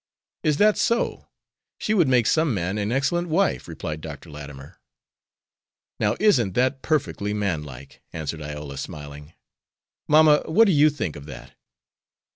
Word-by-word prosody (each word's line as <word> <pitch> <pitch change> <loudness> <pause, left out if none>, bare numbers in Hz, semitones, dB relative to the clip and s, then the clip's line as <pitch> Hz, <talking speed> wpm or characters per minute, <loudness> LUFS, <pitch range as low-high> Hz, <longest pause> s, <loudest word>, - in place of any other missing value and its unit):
"Is 150 -2 +1
that 210 +3 +4
so? 235 0 0 0.5
She 215 - -1
would 175 -8 +3
make 125 -3 +3
some 155 -1 +2
man 95 +3 -2
an 105 +2 -2
excellent 140 +7 0
wife," 185 +5 +1
replied 80 -2 -6
Dr. 75 0 -9
Latimer. 70 -2 -11 1.2
"Now 105 - +1
isn't 125 - +3
that 130 +2 +1
perfectly 105 - -1
manlike," 75 -10 -4
answered 80 0 -5
Iola, 75 -2 -7
smiling. 75 +1 -9 0.7
"Mamma, 150 0 +6
what 220 +8 +5
do 200 - +3
you 150 -1 +5
think 140 - -4
of 75 0 -10
that? 65 -4 -11
105 Hz, 140 wpm, -24 LUFS, -, 1.2 s, Mamma